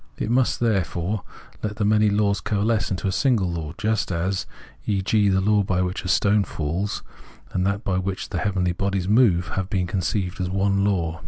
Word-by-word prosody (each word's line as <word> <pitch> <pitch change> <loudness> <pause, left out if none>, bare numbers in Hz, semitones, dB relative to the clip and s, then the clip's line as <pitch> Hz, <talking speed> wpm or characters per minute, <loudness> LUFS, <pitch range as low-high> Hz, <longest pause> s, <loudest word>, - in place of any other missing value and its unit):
It 110 - -2
must, 125 0 +2
therefore, 100 -3 0 0.4
let 105 -1 -3
the 105 - -1
many 105 0 +4
laws 100 0 +1
coalesce 110 +1 0
into 95 0 -2
a - - +1
single 105 -5 +1
law, 80 -2 -4
just 110 -2 0
as, 90 +3 -1 0.4
e.g., 100 +1 +2
the 95 0 +2
law 105 +1 +3
by 95 -2 0
which 90 +1 -3
a - - -5
stone 100 +2 +3
falls, 85 +5 -3 0.5
and 90 +1 0
that 100 +2 -1
by 95 -1 0
which 95 0 -4
the 90 - -2
heavenly 95 -2 0
bodies 95 0 -1
move 100 -5 +4
have 95 -1 -3
been 95 -3 0
conceived 95 +1 -2
as 90 - -1
one 100 +1 +1
law. 85 -5 0
100 Hz, 190 wpm, -23 LUFS, 90-105 Hz, 0.5 s, many